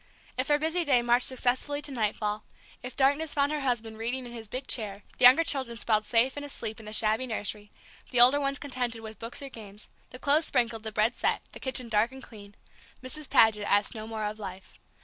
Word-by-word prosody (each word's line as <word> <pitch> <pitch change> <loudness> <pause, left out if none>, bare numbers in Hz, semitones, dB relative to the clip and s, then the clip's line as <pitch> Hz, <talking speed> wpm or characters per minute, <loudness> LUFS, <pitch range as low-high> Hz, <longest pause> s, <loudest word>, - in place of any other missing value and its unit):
If 255 - 0
her 295 -1 +3
busy 320 +3 0
day 255 -6 +3
marched 240 +1 +4
successfully 260 +3 0
to 290 - +2
nightfall; 215 -3 -2 0.4
if 250 +1 -8
darkness 285 +3 +1
found 285 0 +2
her 305 - -1
husband 230 -4 -2
reading 245 +3 -3
in 240 - -9
his 230 -2 -9
big 255 +5 -4
chair, 205 -5 -2 0.2
the 250 - +6
younger 260 +7 +8
children 260 -7 0
sprawled 215 -2 0
safe 245 +4 +2
and 290 - -5
asleep 225 -6 -4
in 220 - -12
the - - -6
shabby 220 +3 +2
nursery, 210 -2 -4 0.4
the 245 - +1
older 255 +4 +8
ones 275 0 -1
contented 245 -5 -4
with 220 -2 -10
books 230 +4 -6
or 275 - -6
games, 210 -4 -12 0.2
the 255 - -10
clothes 290 +4 +2
sprinkled, 235 -3 0
the 220 0 -6
bread 215 +3 +1
set, - - -1
the - - -11
kitchen 260 -2 -2
dark 225 +2 +2
and 265 0 -10
clean; 205 -3 -13 0.5
Mrs. 295 +3 -7
Paget 210 -2 +4
asked 205 0 +2
no 220 -1 -7
more 220 -1 -5
of 210 +1 -4
life. 190 -2 -9
240 Hz, 220 wpm, -28 LUFS, 215-265 Hz, 0.5 s, younger